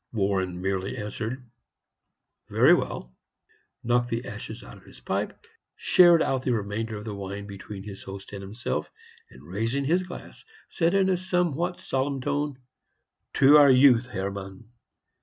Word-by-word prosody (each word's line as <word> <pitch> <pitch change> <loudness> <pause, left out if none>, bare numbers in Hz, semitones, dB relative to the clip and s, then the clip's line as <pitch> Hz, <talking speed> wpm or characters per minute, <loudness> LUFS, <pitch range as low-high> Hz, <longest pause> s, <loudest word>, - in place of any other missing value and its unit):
Warren 95 -4 -1
merely 95 +4 -2
answered, 115 +4 -5 1.0
"Very - - +6
well," - - -2 0.7
knocked 120 0 +1
the 115 +1 -3
ashes - - -8
out - - -11
of - - -17
his - - -15
pipe, - - -3 0.4
shared 175 -2 +6
out 135 -1 0
the 130 -1 0
remainder 110 +1 -3
of 105 - -9
the 110 - -4
wine 100 0 -6
between 100 0 -9
his 100 -1 -9
host 95 +1 -9
and 100 - -6
himself, 105 +5 -4 0.4
and, 65 - -16
raising 115 +9 -1
his 175 +6 +2
glass, 180 -1 -10 0.3
said, 170 +2 +1
in 195 -1 +3
a 185 -1 +2
somewhat 175 -1 -1
solemn 135 +1 -1
tone, 145 +1 -2 0.8
"To 140 +2 +7
our 145 -1 +7
youth, 130 -2 +6
Hermann!" 100 0 -6
115 Hz, 150 wpm, -26 LUFS, 100-140 Hz, 1.0 s, To